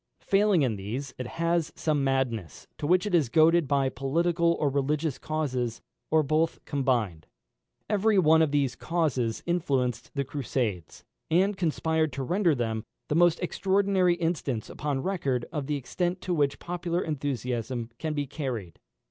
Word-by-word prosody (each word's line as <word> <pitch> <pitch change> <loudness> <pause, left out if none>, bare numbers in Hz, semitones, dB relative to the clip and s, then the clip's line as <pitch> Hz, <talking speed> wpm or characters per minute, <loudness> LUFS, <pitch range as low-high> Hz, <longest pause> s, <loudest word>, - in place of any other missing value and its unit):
Failing 200 -5 +3
in 115 -5 0
these, 120 +8 -5
it 125 - -3
has 170 +2 0
some 150 -3 0
madness, 125 - -1
to 145 - -2
which 180 +3 +3
it 205 - -3
is 155 -8 +3
goaded 160 +3 +4
by 140 -1 +2
political 170 +6 +1
or 150 - +2
religious 140 0 0
causes, 130 -7 -2 0.3
or 160 0 +4
both 155 +3 +1
combined. 120 - -1 0.6
Every 210 0 +2
one 160 -3 +5
of 160 - +3
these 140 -3 +1
causes 140 -9 -1
influenced 140 -9 0
the 140 - 0
Crusades, 125 - -3 0.3
and 190 +5 +3
conspired 160 -2 0
to 135 - -3
render 175 +2 +2
them 115 -3 -2 0.3
the 150 - +1
most 175 0 +4
extraordinary 190 0 +2
instance 165 -9 -2
upon 140 -2 -2
record 140 -11 -1
of 150 -5 -3
the 150 - 0
extent 175 +6 -2
to 180 - -2
which 145 -4 +1
popular 175 0 -2
enthusiasm 125 -5 -3
can 155 -1 -2
be 145 -1 -1
carried. 125 - -5
150 Hz, 155 wpm, -27 LUFS, 130-170 Hz, 0.6 s, one